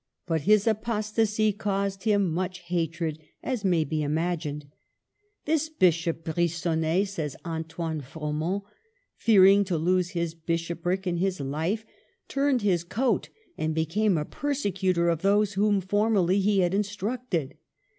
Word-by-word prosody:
But 165 -3 0
his 215 -1 +5
apostasy 215 -1 +1
caused 200 -1 -2
him 205 -3 +3
much 185 +1 -3
hatred, 165 -2 -2 0.2
as 250 -5 -2
may 175 -4 +3
be 155 +1 -2
imagined. 155 -1 -2
•' - - -24 0.8
This 315 0 +1
Bishop 170 - +1
Brigonnet," 170 +2 0
says 160 -8 -4
Antoine 165 -1 -4
Fro 150 +3 -5
ment, 175 +7 -1 0.3
*' - - -46
fearing 200 -2 +6
to 180 -3 -1
lose 180 +2 +1
his 170 -1 -1
Bishopric 170 +3 -2
and 175 -2 -1
his 190 0 0
life, 160 +11 -2 0.4
turned 275 -4 +1
his 180 -5 +2
coat 235 +9 0 0.3
and 155 0 -1
became 175 +5 +1
a 150 - -1
persecutor 190 - 0
of 165 -2 +1
those 205 +1 +3
whom 205 0 +2
formerly 200 -1 +2
he 200 0 +3
had 175 0 +1
instructed. 205 - -2
185 Hz, 140 wpm, -27 LUFS, 165-205 Hz, 0.8 s, fearing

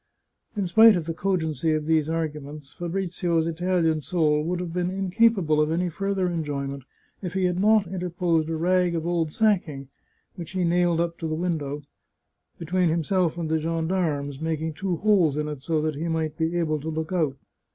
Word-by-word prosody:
In 200 - 0
spite 220 +5 +7
of 170 -3 -2
the 165 - -3
cogency 160 -4 0
of 155 -1 -1
these 160 -1 +2
argu 160 -2 -2
ments, 145 0 -10
Fabrizio's 175 -2 -1
Italian 165 -1 0
soul 150 -3 +1
would 175 +2 -2
have 175 -2 -5
been 180 0 0
incapable 190 -4 +2
of 150 - +1
any 175 +2 0
further 195 +2 -1
enjoyment 140 -5 -3 0.4
if 180 -2 -5
he 190 - +1
had 180 0 +1
not 215 +1 +4
interposed 175 -3 -1
a 165 - -1
rag 180 +1 +2
of 165 -1 -2
old 170 -3 0
sacking, 170 -10 0 0.5
which 170 +1 -8
he 185 -1 0
nailed 175 -1 +2
up 170 0 -2
in 165 - -2
the 155 - -1
window, 150 -4 -2 0.7
between 180 +1 0
himself 170 +1 0
and 170 -2 -2
the 160 - +2
gendarmes, 160 -3 -1
making 160 0 -2
two 185 +3 -2
holes 180 -6 +3
in 150 0 -1
it 150 -3 -6
so 160 +2 0
that 155 0 0
he 155 +4 -4
might 160 -2 -1
be 165 +2 -1
able 155 -3 0
to 155 +3 -5
look 160 +3 -3
out. 155 -6 0
165 Hz, 190 wpm, -25 LUFS, 155-180 Hz, 0.7 s, spite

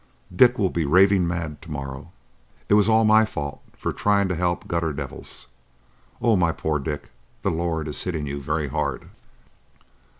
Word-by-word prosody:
Dick 125 +5 +6
will 95 -4 +1
be 85 - 0
raving 95 +4 +4
mad 80 -4 -4
to - - -12
morrow. 70 +2 -6 0.6
It - - +4
was 105 +1 +5
all 110 0 +4
my 110 +1 +6
fault 75 -9 -5 0.2
for - - -3
trying 100 -1 +2
to 90 - 0
help 85 +1 -1
gutter 85 -2 -1
devils. 70 -2 -6 0.7
Oh, 115 -2 +3
my 85 -3 +3
poor 80 -2 -1
Dick, 75 +1 -5 0.3
the - - +1
Lord 80 -2 -2
is 75 - -1
hitting 80 -5 -2
you 70 0 -4
very 75 +1 -2
hard!" 70 -2 -3
85 Hz, 170 wpm, -24 LUFS, 75-95 Hz, 0.7 s, Dick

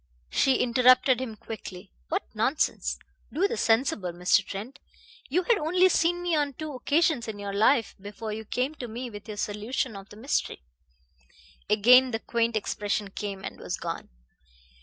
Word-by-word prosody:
She 265 - +3
interrupted 255 +1 +4
him 230 -4 -5
quickly. 200 -3 -9 0.2
"What - - 0
nonsense. 60 0 0 0.3
Do 360 +8 +2
be 470 - -3
sensible, 225 - +1
Mr. 180 +3 +3
Trent. 210 +8 -7 0.5
You 355 +7 +1
had 460 +2 +2
only 360 +4 +3
seen 350 0 +1
me 350 -2 +1
on 290 -2 0
two 310 +2 -6
occasions 285 -1 +1
in 215 -2 -5
your 200 -1 -5
life 225 +3 +3
before 210 +2 -6
you 220 +1 -5
came 250 +6 -2
to 260 -5 -7
me 240 +2 -6
with 205 +1 -10
your 210 -1 -7
solution 215 +4 -2
of 195 +1 -10
the 210 - -13
mystery." 235 - -2 1.1
Again 250 +5 +6
the 225 -2 -2
quaint 230 0 0
expression 205 -1 -2
came 195 -1 -5
and - - -7
was 180 - -4
gone. 170 0 -5
230 Hz, 165 wpm, -27 LUFS, 205-270 Hz, 1.1 s, Again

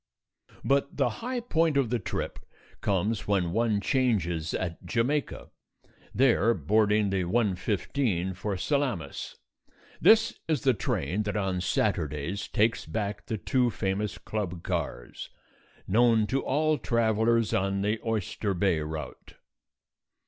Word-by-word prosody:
But 140 0 +1
the 135 -4 +3
high 245 +1 -2
point 165 - +1
of 130 -5 +1
the 120 - +1
trip - - -4 0.4
comes 105 +2 0
when 95 -4 +1
one 110 0 +1
changes 95 - 0
at 85 -3 -4
Jamaica, 130 +5 -1 0.6
there 115 0 +3
boarding 105 +4 +2
the 95 -1 +1
1:15 100 -1 0
for 100 +1 -3
Salamis. 120 - -2 0.7
This 225 0 +5
is 155 -5 +1
the 130 -2 +4
train 105 -2 -1
that 105 0 -2
on 95 -3 -1
Saturdays 75 +1 -1
takes 110 +2 +1
back 105 -2 -3
the 110 - -2
two 125 +4 +1
famous 100 0 -2
club 90 -6 -4
cars, - - -4 0.6
known 115 +1 +4
to 135 +6 0
all 155 +2 +1
travellers 115 -1 +2
on 95 +1 0
the 105 +2 0
Oyster 105 -2 -2
Bay 90 -2 +2
route. 75 -4 -7
105 Hz, 125 wpm, -28 LUFS, 95-120 Hz, 0.7 s, This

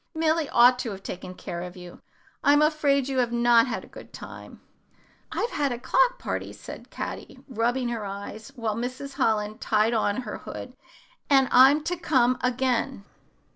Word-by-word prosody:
Milly 320 -1 +1
ought 245 +1 +6
to 250 - -3
have 195 -2 -8
taken 185 0 -7
care 170 -1 -6
of 180 +1 -8
you. 180 -1 -11 0.4
I'm 290 +1 +5
afraid 290 -3 +2
you 265 -1 -1
have 240 -2 +1
not 235 0 +4
had - - -3
a - - -13
good - - -13
time." - - -10 0.7
"I've 470 - -2
had 285 -2 0
a 240 - -2
clock - - +2
party," - - -4
said - - -10
Caddy, - - -6
rubbing 245 0 0
her 230 -3 -3
eyes, 200 +4 -7
while 225 -4 -2
Mrs. 255 +4 -5
Holland 215 -1 0
tied 215 +2 +2
on 215 0 0
her 215 -4 -6
hood, 250 - -8 0.5
"and 270 -2 +5
I'm 270 +4 +6
to 345 +3 -1
come 255 -7 +2
again." 250 -2 0
245 Hz, 175 wpm, -26 LUFS, 220-275 Hz, 0.7 s, ought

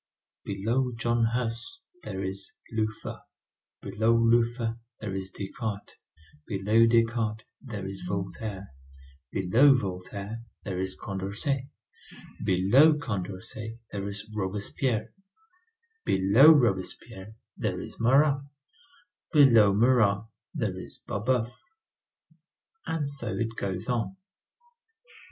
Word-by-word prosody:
Below 125 +5 -1
John 120 0 +1
Huss, 120 - -2 0.2
there 95 - -5
is 95 +1 -4 0.2
Luther; 110 -1 -3 0.6
below 110 +4 +2
Luther, 115 0 +2 0.2
there 105 -3 -5
is 95 0 -4
Descartes; 100 +1 -5 0.5
below 105 +4 +3
Descartes, 115 -1 +1 0.2
there 105 -7 -6
is 95 0 -7
Voltaire; 100 +1 -4 0.6
below 115 +10 +5
Voltaire, 100 +2 -5 0.2
there 95 -2 -3
is 95 0 -3
Condorcet; 105 +8 -2 0.8
below 100 - +5
Condorcet, 110 -1 -5
there 100 -1 -4
is 100 +1 -6
Robespierre; 110 +3 -1 0.9
below 100 +11 +6
Robespierre, 110 -4 0 0.2
there - - -2
is - - -9
Marat; 140 +4 +4 0.9
below 120 - +7
Marat 110 -1 +3 0.3
there - - -2
is - - -6
Babeuf. 115 +3 0 1.4
And 160 -3 -1
so 140 -1 -1
it 115 0 -2
goes 95 -4 -3
on. 125 - -1
110 Hz, 95 wpm, -28 LUFS, 100-120 Hz, 1.4 s, below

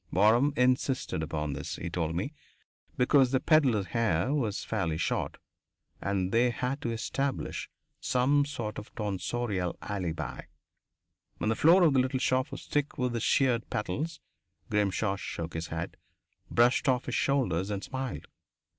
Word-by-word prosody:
Waram 115 +9 +4
insisted 125 - +1
upon 75 -2 -2
this, 70 - -5
he 85 - -5
told 85 -1 -2
me, 100 - -2 0.6
because 130 +1 +5
the 130 0 +2
pedlar's 130 - +3
hair 115 - +1
was 115 -8 -1
fairly 85 -8 -1
short 85 - -1 0.6
and 95 -1 -1
they 120 +2 +4
had 125 +4 -2
to 120 - -2
establish 135 +4 -2 0.3
some 130 +3 +3
sort 120 -7 -4
of 105 - -10
a - - -23
tonsorial 105 -3 -2
alibi. 90 -5 -4 1.0
When 110 - -1
the - - +1
floor 170 - +6
of 160 -5 +5
the 135 - +4
little 130 +1 +1
shop 130 0 +1
was - - -7
thick 145 -1 -1
with 125 -3 0
the 115 - -1
sheared 125 -1 +2
"petals," 135 - -3 0.5
Grimshaw 100 -1 +1
shook 85 -4 -5
his 80 0 -3
head, - - -5 0.5
brushed 120 +3 +3
off 125 0 +1
his - - -4
shoulders, 105 -10 +1
and 100 -1 -3
smiled. 130 -1 -4
115 Hz, 155 wpm, -29 LUFS, 95-130 Hz, 1.0 s, floor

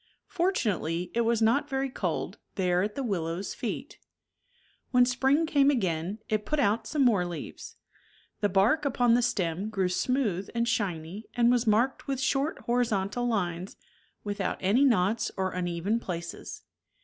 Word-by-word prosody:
Fortunately 185 - -1
it 235 - +2
was 230 -1 +2
not 280 +7 +2
very 270 0 0
cold, - - -3 0.2
there 180 -2 +2
at 210 +2 -2
the 275 - -2
willow's 180 -4 -2
feet - - -5 0.9
When 250 -1 +5
spring 265 +5 +2
came 285 -3 +4
again, 185 - 0
it 215 -1 0
put 305 +5 -1
out 220 -1 +1
some 290 -4 +2
more 210 -7 +4
leaves. 175 -2 -7 0.6
The 205 - +1
bark 205 +11 +3
upon 245 -4 +3
the 245 - +4
stem 200 -5 -1
grew 190 -4 0
smooth 200 -2 0
and 235 0 +1
shiny 200 -4 -2
and 240 0 +4
was 245 -1 +1
marked 235 +8 +2
with 270 -2 -1
short 275 +3 0
horizontal 235 -1 0
lines, 180 -5 -2 0.5
without 205 -2 -2
any 210 +9 +3
knots 220 -3 +2
or 190 -1 0
uneven 180 +5 -1
places. 170 -5 -6
220 Hz, 150 wpm, -28 LUFS, 185-250 Hz, 0.9 s, When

